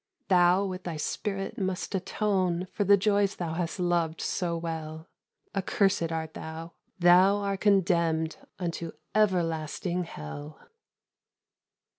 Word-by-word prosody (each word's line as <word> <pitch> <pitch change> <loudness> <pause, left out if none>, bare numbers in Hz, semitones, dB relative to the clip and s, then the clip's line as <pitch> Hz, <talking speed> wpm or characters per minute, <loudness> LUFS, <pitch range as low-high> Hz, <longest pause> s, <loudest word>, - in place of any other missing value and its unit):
"Thou 180 +1 +5
with 185 -1 -5
thy 170 -3 -3
spirit 195 +5 -3
must 190 0 -2
atone 190 -2 0
For 205 - 0
the 200 +1 +6
joys 200 0 +2
thou 165 -2 -3
hast 170 +2 -3
loved 170 -2 +1
so 175 -3 -1
well; 160 -1 -5 0.5
Accursed 190 -3 +1
art 160 -1 -3
thou! 160 +1 -7 0.2
thou 180 +2 +6
are 200 -1 -1
condemned 170 -5 +2 0.2
Unto 170 -2 -4 0.2
everlasting 175 -3 0
hell!" 145 - -8
175 Hz, 115 wpm, -28 LUFS, 165-195 Hz, 0.5 s, the